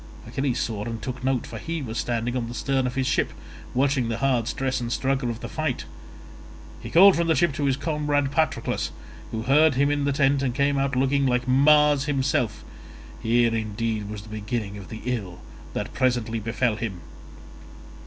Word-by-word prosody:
Achilles 135 -2 -1
saw 110 -5 -2
and 115 -1 -4
took 125 +3 -6
note, 130 -2 0
for - - -7
he 165 -2 -4
was 115 -1 -4
standing 120 0 -1
on 120 -2 -2
the 120 - -7
stern 130 +2 0
of 125 - -5
his 130 -1 0
ship - - +1 0.4
watching 130 -2 +2
the 115 - -1
hard 125 -3 +1
stress 130 0 -1
and 120 -1 -3
struggle 130 -1 0
of 115 0 -5
the - - -5
fight. - - -2 1.0
He - - -7
called 190 +3 +7
from 170 0 0
the 160 - +3
ship 160 +2 +2
to 145 +1 -2
his 135 -1 +2
comrade 145 -2 0
Patroclus, 160 +2 0 0.4
who 110 0 -4
heard 150 +3 +4
him 140 +2 +3
in 145 -1 0
the 140 - +2
tent 140 -1 +2
and 125 -3 -1
came 140 0 +2
out 135 -1 0
looking 135 +1 +2
like 125 0 0
Mars 145 +1 +5
himself—here 120 -3 -1
indeed 110 -1 -2
was 105 -1 -6
the 110 - -13
beginning 105 -1 -4
of 100 -3 -10
the 110 - -7
ill 105 -8 -3 0.3
that - - -4
presently 120 -3 0
befell 115 +1 0
him. 105 -5 -4
130 Hz, 190 wpm, -25 LUFS, 115-140 Hz, 1.0 s, called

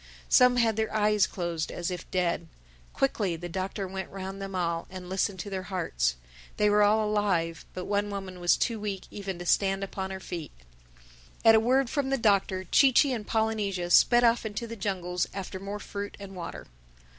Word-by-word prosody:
Some 250 -1 +6
had 230 -3 +2
their 220 0 0
eyes 210 -2 +3
closed, 170 -3 -3
as 175 +1 -3
if 180 -1 -6
dead. 170 -2 0 0.4
Quickly 205 -10 0
the 175 +2 -6
Doctor 190 +2 -3
went 190 +1 -5
round 195 0 -6
them 195 -1 -5
all 170 -2 -1
and 185 -1 -8
listened 190 +1 -1
to 205 - -7
their 190 -1 -2
hearts. - - 0 0.4
They 210 0 +3
were 210 0 +4
all 210 +1 +4
alive; 190 -6 0
but 185 - -4
one 205 0 0
woman 195 -2 -6
was 175 0 +3
too 230 -3 -1
weak 200 -2 -4
even 195 -3 -5
to 175 - -7
stand 195 +2 +2
upon 190 -1 -4
her 190 0 -5
feet. 170 -5 -6 0.9
At 225 - +9
a 220 - +7
word 255 +4 +2
from 275 +2 -1
the 270 - +1
Doctor, 200 -4 +2
Chee 265 +9 +5
Chee 265 +2 +4
and 220 -4 -5
Polynesia 210 -5 -1
sped 240 +6 +6
off 235 0 +4
into 220 +1 -4
the 230 0 -7
jungles 180 -4 -2
after 190 -1 -5
more 200 +2 -5
fruit 205 0 -6
and 195 -1 -9
water. 175 -2 -7
195 Hz, 195 wpm, -28 LUFS, 180-215 Hz, 0.9 s, At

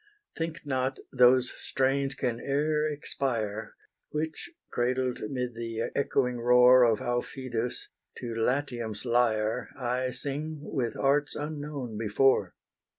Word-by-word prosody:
Think 165 +1 -4
not 130 -1 -1 0.2
those 125 0 +5
strains 135 +1 0
can 120 -3 -1
e'er 150 +3 +1
expire, 115 -7 -3 0.3
Which, 160 - -3 0.2
cradled 125 +1 0
'mid 125 -2 -2
the 115 -1 -3
echoing 125 -3 +1
roar 125 +1 +7
Of 115 -3 +4
Aufidus, 120 -1 -3 0.3
to 120 -2 -5
Latium's 120 -2 -1
lyre 115 -1 +1
I 125 0 -1
sing 145 +4 -3
with 120 -7 -2
arts 145 +2 +2
unknown 145 -6 -5
before. 115 +5 +2
125 Hz, 110 wpm, -29 LUFS, 120-140 Hz, 0.3 s, roar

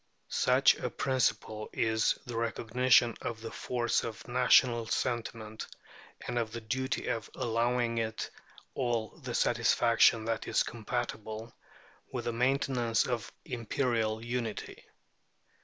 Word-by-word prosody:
Such - - +4
a - - -3
principle 125 -5 -1
is 110 -1 +1
the 120 - -6
recognition 115 +1 +3
of 115 -1 -4
the 115 0 -7
force 120 -2 0
of 115 -1 -6
national 120 -1 +4
sentiment, 110 -3 -3 0.6
and 120 - -1
of 110 -2 -2
the 115 - -5
duty 130 +4 -2
of 115 -1 -2
allowing 115 0 0
it 110 -1 -3 0.4
all 120 -4 -1
the - - -5
satisfaction 115 -1 +4
that 115 -1 -2
is - - +2
compatible 110 0 -4 0.6
with - - -4
the 120 - -1
maintenance 125 -2 +1
of 120 -5 -3
imperial 115 -2 -1
unity. 120 -3 -4
115 Hz, 120 wpm, -31 LUFS, 110-125 Hz, 0.6 s, Such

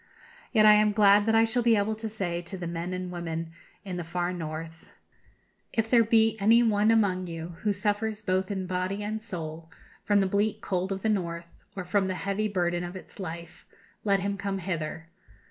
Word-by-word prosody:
Yet 215 -2 +5
am 210 0 +7
I - - -2
glad 205 0 +5
that 225 - +3
I 225 - +6
shall 230 +2 +1
be 235 -1 +4
able 210 +1 +1
to 220 +1 -5
say 180 -5 -3
to 175 +3 -8
the 180 - -5
men 170 +1 -4
and 185 0 -4
women 165 -2 -4 0.3
in 185 -2 -4
the 175 - -3
far 175 +2 -2
North, 165 -1 -7 0.8
'If 225 0 0
there 235 -2 +6
be 225 0 +3
any 225 +4 +5
one 215 -1 +3
among 195 -5 +2
you 165 0 -6
who 210 - 0
suffers 210 +1 -1
both 185 -1 0
in 190 -2 -2
body 185 +2 -2
and 215 +1 -3
soul 165 -6 -6 0.3
from 205 0 +3
the 195 - +3
bleak 205 +2 0
cold 185 0 -2
of 195 0 -3
the 220 - +2
North, 170 -4 -2 0.2
or 185 -2 -5
from 195 +1 +1
the 185 - -2
heavy 200 +3 -1
burden 175 -3 0
of 175 +1 -6
its 185 - -11
life, 170 -2 -8 0.4
let 200 -2 +2
him 200 +1 -2
come 200 -1 -2
hither. 165 -3 -4
195 Hz, 205 wpm, -28 LUFS, 175-210 Hz, 0.8 s, am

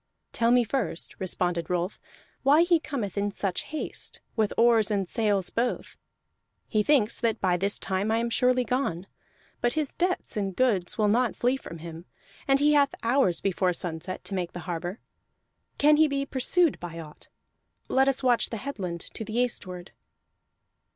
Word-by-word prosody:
"Tell 230 0 +1
me 245 0 +5
first," 220 -8 -3
responded 175 -2 -1
Rolf, 180 +2 -2 0.4
"why 290 +5 +5
he 345 -1 +3
cometh 235 - -4
in 205 +1 0
such 195 -2 -2
haste, 310 - -4 0.2
with 215 -3 +1
oars 230 -2 +4
and 200 -3 0
sails 205 -4 0
both. 240 +2 -2 0.7
He 215 - +1
thinks 235 -2 +3
that 230 -3 0
by 185 -2 +2
this 200 +3 +1
time 190 +2 -2
I 225 - +2
am 235 0 -1
surely 250 +1 +3
gone; 245 -9 -1 0.6
but 240 0 +1
his 305 -3 -2
debts 360 +1 -1
and 195 -3 -2
goods 210 -9 +1
will 215 -2 +3
not 235 +3 +2
flee 245 +2 +1
from 170 -10 -8
him, 165 +1 -9 0.4
and 275 0 +4
he 295 +1 +4
hath 285 -1 +3
hours 230 -7 +2
before 185 -2 +1
sunset 175 +1 -5
to - - -7
make 180 -2 -3
the 175 - -6
harbor. 175 +3 -4 0.8
Can 300 +1 +5
he 315 0 +5
be 275 -1 -1
pursued 290 +5 +2
by 170 -1 -7
aught? 155 -2 -12 0.6
Let 265 +1 +3
us 275 0 +1
watch 245 -2 +3
the 225 - -4
headland 195 -10 -5
to - - -5
the 220 +2 -5
eastward." 185 -7 -2
220 Hz, 170 wpm, -27 LUFS, 185-260 Hz, 0.8 s, me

